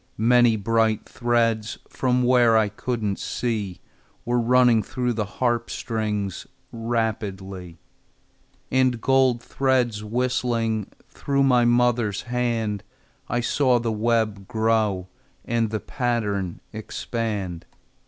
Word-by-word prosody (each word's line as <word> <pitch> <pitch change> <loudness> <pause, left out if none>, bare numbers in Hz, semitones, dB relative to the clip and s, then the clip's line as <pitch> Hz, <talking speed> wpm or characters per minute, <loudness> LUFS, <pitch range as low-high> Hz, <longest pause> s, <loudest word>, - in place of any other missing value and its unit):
Many 120 +1 +4
bright 110 +1 +1
threads, 115 -2 0
From 125 -1 0
where 120 -2 +5
I 110 -2 +2
couldn't 105 -1 -3
see, 105 -7 -3 0.4
Were 120 +1 +1
running 120 -1 +4
through 125 +4 -2
the 105 -3 -2
harp 120 -2 0
strings 105 -4 -3 0.2
Rapidly, 100 -6 -3 0.9
And 130 -2 +2
gold 130 -2 +2
threads 125 -5 0
whistling 115 -2 -1 0.2
Through 140 -1 -1
my 125 -3 +4
mother's 120 -4 +2
hand. 115 -4 -1 0.5
I 120 +1 0
saw 125 +1 +2
the 115 -1 -1
web 110 -2 0
grow, 110 -5 +1 0.4
And 115 -1 0
the 110 0 -2
pattern 105 -9 -2
expand. 105 -5 -4
115 Hz, 105 wpm, -24 LUFS, 105-120 Hz, 0.9 s, where